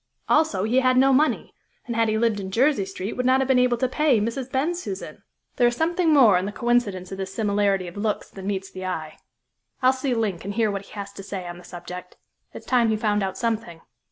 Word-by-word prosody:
Also 305 -12 +2
he 235 +5 +3
had 255 -1 +3
no 270 +1 +5
money, 300 +4 +1 0.3
and, 235 - -4
had 225 -1 +2
he 215 - +1
lived 225 -2 +1
in 190 -1 -5
Jersey 235 0 +2
Street, 195 +2 -5
would 250 - -2
not 260 +1 +4
have 265 - 0
been 260 -2 +4
able 250 -1 +3
to 255 - +1
pay 280 -2 +2
Mrs. 235 +4 -3
Bensusan. 345 +7 -3 0.4
There 245 - +5
is 240 - 0
something 335 +3 +1
more 235 -11 +6
in 185 - -3
the - - -3
coincidence 205 -5 0
of 195 - -6
this 190 0 -4
similarity 200 -3 0
of 175 - -9
looks 210 0 -2
than 195 0 -8
meets 195 -1 -3
the 185 - -8
eye. 160 -4 -4 0.7
I'll 255 +1 +6
see 260 -1 -1
Link 210 -7 -1
and 200 +1 -5
hear 220 -2 +2
what 200 0 -5
he - - -18
has 200 -1 -7
to 200 - -9
say 190 -2 -6
on 175 0 -8
the - - -14
subject. 180 +1 -9 0.3
It's - - -10
time 245 -3 +3
he 220 - +1
found 210 -1 +1
out 190 -1 -3
something." 225 -8 -3
220 Hz, 240 wpm, -24 LUFS, 195-255 Hz, 0.7 s, more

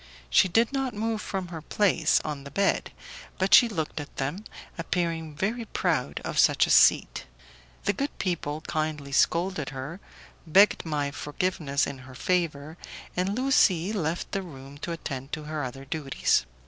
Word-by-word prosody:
She 185 - +6
did 225 +8 +2
not 265 -4 -1
move 220 0 -1
from 190 -3 -4
her 165 -2 -7
place 200 +4 +2
on 150 -2 -4
the 140 - -9
bed, 195 +7 0 0.5
but 190 +1 +1
she 240 - +8
looked 160 -6 -3
at 145 - -8
them, 155 +11 -3 0.3
appearing 165 -2 -2
very 225 +9 -2
proud 160 - -1
of - - -2
such - - +5
a - - -2
seat. - - +4 0.6
The 200 - +1
good 280 +4 -3
people 155 -4 -2
kindly 155 -3 -3
scolded 170 +1 +1
her, 135 +7 -7 0.5
begged 195 +5 +5
my 145 -2 -1
forgiveness 150 -1 -1
in 140 - -6
her 130 0 -12
favour, 160 -2 -1 0.4
and 185 +3 0
Lucie 210 -8 +3
left 170 -4 -2
the 195 - -1
room 140 -5 -11
to 170 - -4
attend 135 -4 -6
to 155 - -3
her 150 0 -4
other 135 +2 -6
duties. 135 - 0
160 Hz, 160 wpm, -27 LUFS, 145-195 Hz, 0.6 s, she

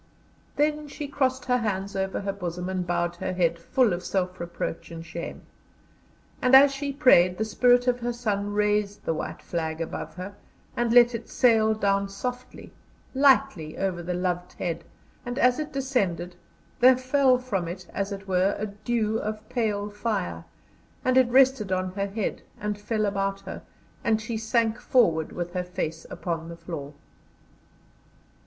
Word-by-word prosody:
Then 300 0 +1
she 290 0 -6
crossed 260 -2 0
her 250 0 +2
hands 200 -3 -2
over 190 +1 -1
her 200 0 -2
bosom, 180 -1 -4
and 185 -1 -2
bowed 175 0 -1
her 185 - -3
head, 170 -2 +1
full 240 +4 +2
of 175 +1 -4
self 185 -1 -2
reproach 170 -1 -5
and 165 0 -8
shame; 170 +1 -7 1.0
and 255 +1 +6
as 275 +1 +8
she 280 +1 -3
prayed, 185 -11 +5
the 220 - 0
spirit 245 +2 +4
of 245 0 +2
her 240 0 -2
son 205 -4 -2
raised 210 0 0
the 165 - +1
White - - -5
Flag 160 -2 -3
above 165 - -5
her 185 +3 -7 0.4
and 240 -1 0
let 240 0 +7
it 230 0 -6
sail 220 -3 +4
down 200 -1 +1
softly, 250 +5 -6 0.4
lightly 265 - +3
over 185 -3 -1
the 175 +1 -3
loved 180 0 -2
head, 170 -2 -3 0.4
and 245 +1 -5
as 250 -1 +4
it 305 - -4
descended 200 -11 -1 0.4
there 255 +1 +7
fell 255 0 +3
from 210 -9 -2
it 180 +2 -6
as 200 +1 -2
it 195 0 -7
were 185 +1 +2
a 215 - -2
dew 215 +1 -1
of 215 0 -5
pale 210 -4 -1
fire, 205 - -3 0.6
and 255 0 +3
it 260 -2 +5
rested 260 -5 +4
on 185 0 0
her 200 +1 -2
head, 205 +1 -3 0.2
and 210 0 -3
fell 215 0 0
about 195 -1 -1
her, - - -7 0.4
and 220 -1 +2
she 225 +1 -4
sank 225 0 +1
forward 165 -11 +2
with 175 0 -5
her 180 -1 -1
face 165 -3 -4
upon 165 -2 -4
the 170 - -8
floor. 150 -5 -7
205 Hz, 170 wpm, -26 LUFS, 180-245 Hz, 1.0 s, as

